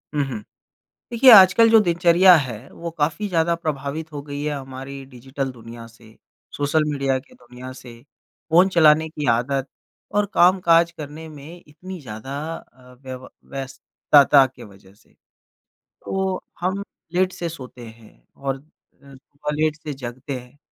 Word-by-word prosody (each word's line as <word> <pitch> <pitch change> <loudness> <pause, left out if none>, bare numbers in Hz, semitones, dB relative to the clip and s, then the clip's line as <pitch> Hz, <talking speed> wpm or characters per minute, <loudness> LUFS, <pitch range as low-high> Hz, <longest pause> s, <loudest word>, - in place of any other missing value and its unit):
हुँ, 145 - +2
हुँ। 115 -5 -5 0.7
देखिए 245 +2 +6
आजकल 200 +3 +8
जो 225 - +7
दिनचर्या 175 0 +5
है, 125 -4 -4
वो 170 0 -7
काफ़ी 165 +6 -2
ज़्यादा 170 -1 +1
प्रभावित 155 0 -4
हो 145 - -5
गई 145 0 -6
है 150 -1 -2
हमारी 135 0 -8
डिजिटल 130 +2 -5
दुनिया 115 -1 -11
से, 115 -1 -19 0.4
सोशल 145 +2 +1
मीडिया 135 -2 0
की 130 - -17
दुनिया 125 +1 -12
से। 120 -2 -13 0.5
फ़ोन 180 +4 +5
चलाने 160 -3 +4
की 150 -2 -5
आदत 135 +3 -1 0.5
और 205 0 +2
काम-काज 170 -2 +4
करने 155 +2 -8
में 155 +4 -12
इतनी 180 +5 -10
ज़्यादा 125 +1 -8 0.2
अ, 125 0 -17
व्यव 130 -1 -9 0.2
व्यस्तता 135 +1 +3
की 130 - -14
वजह 95 -1 -18
से। - - -28 1.0
तो 190 -1 -2 0.2
हम 190 +3 -2 0.3
लेट 185 +1 +2
से 170 -1 -4
सोते 125 -6 -10
हैं 110 -1 -16 0.2
और 135 -1 -3
अ, - - -19 0.5
सुबह 145 +2 -7
लेट 155 0 0
से 150 -2 -5
जगते 130 +1 -7
हैं। 125 +3 -17
145 Hz, 150 wpm, -22 LUFS, 130-170 Hz, 1.0 s, आजकल